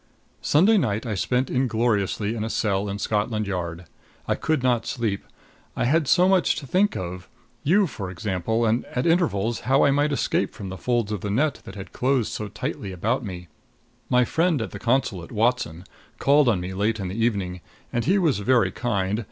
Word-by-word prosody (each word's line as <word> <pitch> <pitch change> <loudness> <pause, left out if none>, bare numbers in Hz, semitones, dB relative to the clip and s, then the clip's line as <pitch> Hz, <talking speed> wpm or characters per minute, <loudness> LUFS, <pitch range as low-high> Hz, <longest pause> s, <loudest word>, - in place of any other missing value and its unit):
Sunday 200 +9 +4
night 110 - -1
I 115 - -2
spent 125 +6 0
ingloriously 110 -4 0
in 110 -2 -3
a 110 - -3
cell 100 -2 0
in 100 - -3
Scotland 105 +1 -1
Yard. 90 -3 -4 0.4
I - - +2
could 155 -5 -1
not 125 -3 +1
sleep. 110 -5 -2 0.5
I - - 0
had 150 +3 +2
so 180 +6 +5
much 190 -2 +3
to 145 - -6
think 190 +9 +2
of 90 0 -6 0.3
you, 195 +7 +4
for 105 - -6
example, 95 +5 -1
and 115 +2 +1
at 125 - -3
intervals 120 - +1
how 135 +2 +3
I 140 - +5
might 145 +2 +2
escape 140 - 0
from 95 - -7
the 95 - -6
folds 120 -4 0
of 105 -4 -3
the 105 - -3
net 135 +6 0
that 95 - -9
had 95 -2 -9
closed 130 -3 +1
so 105 - -4
tightly 100 -1 -5
about 110 +8 -1
me. 90 -4 -7 0.6
My 125 0 +4
friend 165 +2 +1
at 110 -5 -4
the - - -7
consulate, 115 -8 0
Watson, 110 -7 0 0.3
called 140 -1 +4
on 105 -6 +2
me 90 +1 -5
late 105 +3 0
in 95 - -3
the 105 +5 -2
evening; 95 -6 -1 0.3
and 120 - 0
he 195 - +3
was 160 - +2
very 120 +3 +3
kind. 105 -3 -1
115 Hz, 195 wpm, -24 LUFS, 100-130 Hz, 0.6 s, so